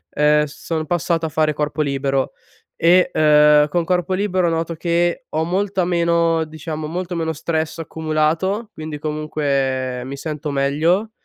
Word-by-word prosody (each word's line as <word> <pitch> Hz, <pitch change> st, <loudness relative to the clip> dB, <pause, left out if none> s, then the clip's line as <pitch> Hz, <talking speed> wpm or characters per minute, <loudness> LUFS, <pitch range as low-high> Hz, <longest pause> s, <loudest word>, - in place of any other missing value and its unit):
uhm, 150 Hz, 0 st, +4 dB
sono 155 Hz, +2 st, -4 dB
passato 170 Hz, -1 st, 0 dB
a -, -, -5 dB
fare 155 Hz, 0 st, +1 dB
corpo 150 Hz, +1 st, -1 dB
libero 135 Hz, -1 st, -1 dB, 0.4 s
e, 180 Hz, +2 st, +4 dB
uhm, 150 Hz, -1 st, +5 dB
con 170 Hz, +3 st, 0 dB
corpo 180 Hz, +1 st, 0 dB
libero, 185 Hz, -3 st, +1 dB
noto 165 Hz, 0 st, -1 dB
che 170 Hz, -, 0 dB
ho 155 Hz, +1 st, -1 dB
molta 190 Hz, +1 st, 0 dB
meno 170 Hz, -2 st, +2 dB
diciamo, 155 Hz, 0 st, -6 dB
molto 175 Hz, +2 st, -4 dB
meno 160 Hz, -1 st, -1 dB
stress 160 Hz, +1 st, -2 dB
accumulato, 160 Hz, +7 st, -1 dB
quindi 155 Hz, -1 st, -6 dB
comunque 140 Hz, -4 st, -1 dB
mi 140 Hz, +1 st, -6 dB
sento 150 Hz, 0 st, -4 dB
meglio. 155 Hz, +10 st, +1 dB
160 Hz, 145 wpm, -20 LUFS, 150-170 Hz, 0.4 s, uhm